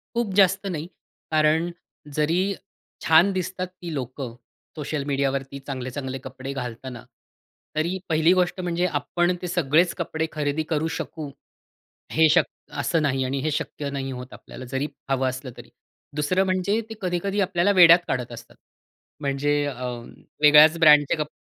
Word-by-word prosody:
खूप 235 -4 0
जास्त 195 0 +4
नाही, 165 -5 -3 0.4
कारण 155 +2 +2 0.4
जरी 160 +5 +2 0.6
छान 165 +5 +5
दिसतात 185 0 -3
ती 180 -2 -9
लोकं 130 -2 -5 0.4
सोशल 150 -1 -3
मीडियावरती 140 -1 -1
चांगले, 130 -2 -6
चांगले 130 0 -5
कपडे 130 +1 -6
घालताना, 125 -1 -6 0.7
तरी 170 +5 0
पहिली 160 +2 +4
गोष्ट 185 0 +1
म्हणजे 175 0 0
आपण 175 +5 0
ते 180 - -3
सगळेच 170 0 +2
कपडे 160 -2 -2
खरेदी 150 0 -1
करू 160 +1 +1
शकू 155 -4 -6 0.8
हे 160 0 +5
शक् - - +3 0.3
असं 165 -2 +1
नाही 135 -3 +1
आणि 135 +2 -2
हे 155 - 0
शक्य 145 -1 -3
नाही 135 -1 -4
होत 125 0 -8
आपल्याला, 130 - -11
जरी 135 +3 -3 0.2
हवं 130 -1 +1
असलं 130 0 -5
तरी. - - -13 0.5
दुसरं 185 +6 +1
म्हणजे 190 +3 0
ते - - -5
कधी-कधी 190 +2 -1
आपल्याला 185 0 +2
वेड्यात 175 -3 +8
काढत 125 -2 -2
असतात. 120 - -11 0.6
म्हणजे 145 +1 0
अ, 130 -3 -4 0.6
वेगळ्याच 150 +2 +7
ब्रँडचे 150 -3 +6
कपडे 150 -1 -6
150 Hz, 150 wpm, -24 LUFS, 135-175 Hz, 0.8 s, वेड्यात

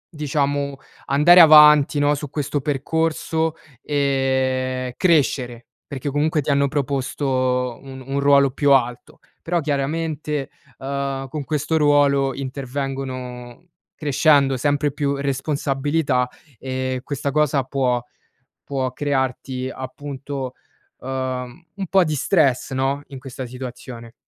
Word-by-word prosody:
diciamo 145 -1 -1 0.3
andare 170 +6 +7
avanti 150 -2 +7
no, 145 0 +3
su 145 -1 -6
questo 145 0 -2
percorso 160 +3 -1 0.3
e 130 -2 0
crescere, 130 -8 +1 0.2
perché 140 0 -5
comunque 150 +2 0
ti 145 - -5
hanno 140 0 +2
proposto 130 -3 -1
un 135 -1 -10
un 135 +1 -2
ruolo 140 -1 +4
più 145 +1 +1
alto. 125 -3 +1 0.3
Però 170 +1 +1
chiaramente, 150 0 -2 0.3
uhm, 135 0 -3
con 145 +2 -5
questo 155 +2 -1
ruolo 145 -2 +3
intervengono, 130 0 -6 0.3
crescendo 145 -2 +3
sempre 145 +2 +1
più 140 -1 -1
responsabilità 140 -1 0 0.3
e 130 0 -3
questa 140 0 -3
cosa 150 -2 +2
può 125 -2 0 0.6
può 130 -2 -2
crearti 130 -2 -2
appunto, 135 0 -6 0.4
uhm, 130 +3 -5
un 195 - -4
po' 190 +2 +4
di 155 - -1
stress, 140 -5 +1
no, 135 +2 -1
in 135 - -9
questa 130 -1 -7
situazione. 125 -2 -9
140 Hz, 115 wpm, -21 LUFS, 130-145 Hz, 0.6 s, andare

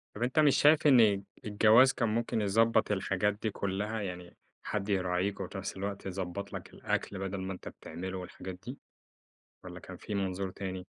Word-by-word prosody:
طب 115 - -3
أنت 130 +5 +1
مش 150 -3 +5
شايف 150 +1 +5
إن 110 -7 +5 0.2
الجواز 110 +5 +6
كان 115 -3 0
ممكن 115 0 0
يضبّط 110 +2 +3
الحاجات 100 +1 +1
دي 110 - 0
كُلّها؟ 100 +3 -2
يعني 90 -3 -7 0.3
حد 105 -1 -3
يراعيك، 95 0 0
وفي 95 +1 -5
نفس 95 0 -5
الوقت 100 +1 -4
يضبّط 95 +1 -5
لك - - -6
الأكل، 100 - -2
بَدَل 95 0 -3
ما 95 +1 -3
أنت 90 - -10
بتعمله 95 +2 -6
والحاجات 90 0 -7
دي، 125 +3 -6 0.9
والّا - - -8
كان - - -10
في 105 - -6
منظور 95 -1 -2
تاني؟ 95 -1 -6
100 Hz, 175 wpm, -31 LUFS, 95-110 Hz, 0.9 s, الجواز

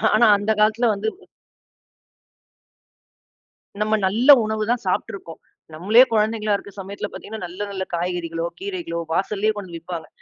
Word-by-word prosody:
ஆனா 230 +2 +5
அந்தக் 210 +1 -1
காலத்துல 220 +3 +3
வந்து 205 +2 -3 2.7
நம்ம 215 +1 +1
நல்ல 230 +9 0 0.2
உணவு 215 0 -2
தான் 245 - -1
சாப்ட்டு 185 - -1
இருக்கோம். 165 -5 -9 0.3
நம்மளே 210 +10 +5
குழந்தைகளா 215 -1 +1
இருக்க 200 - -12
சமயத்தில 200 +2 -6
பாத்தீங்கன்னா 220 -1 -8
நல்ல, 180 +3 -10
நல்ல 190 -1 -3
காய்கறிகளோ, 170 -1 -3
கீரைகளோ 370 - -4
வாசலே 210 +4 0
கொண்டு 200 -3 -7
வந்து 170 - -6
விப்பாங்க. 165 -1 -7
205 Hz, 135 wpm, -22 LUFS, 180-220 Hz, 2.7 s, ஆனா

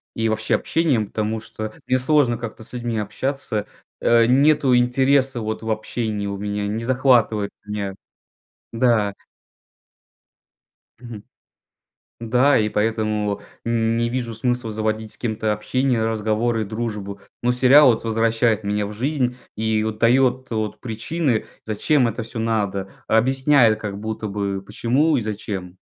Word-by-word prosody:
и, 115 -1 0
вообще 110 0 0
общением, 140 -11 +1
потому 110 +1 -2
что, 110 -1 -7
мне 130 0 +2
сложно 130 -3 +3
как-то 115 -1 -7
с - - -8
людьми 120 -2 -3
общаться. 105 +1 -2 0.3
Э, 115 -1 +4
нету 135 +1 +4
интереса 130 +1 +2
вот 110 +1 -3
в 110 - -5
общении 110 -1 -2
у 100 0 -3
меня, 105 0 -3
не 110 +3 -3
захватывает 120 -5 +2 0.2
меня, 100 -2 -4 0.8
да. 115 -4 +2 1.9
Мгм. 115 -4 -9 1.0
Да, 125 +5 +3
и 105 -1 +2
поэтому 105 -1 -1 0.2
не 115 0 +1
вижу 120 -2 -3
смысла 120 0 -1
заводить 110 0 -2
с - - -7
кем-то 110 -2 -1
общение, 120 +2 0
разговоры, 110 +1 0
дружбу. 105 -2 -5 0.2
Но 125 - +2
сериал 130 +4 +6
вот 115 - -4
возвращает 115 0 +1
меня 105 0 -1
в 105 - -7
жизнь 125 +1 -1 0.2
и 110 0 0
вот 110 -1 -3
дает 130 +2 +3
вот 110 -2 -3
причины 120 +2 -2 0.2
зачем 125 +5 +2
это 115 +1 -3
всё 115 +1 -7
надо. 100 -4 -1 0.2
Объясняет 125 -1 +4
как 100 -2 -5
будто 110 0 -4
бы 100 -1 -3
почему 125 +9 +1
и - - +1
зачем. 100 -4 -5
115 Hz, 135 wpm, -22 LUFS, 105-125 Hz, 1.9 s, сериал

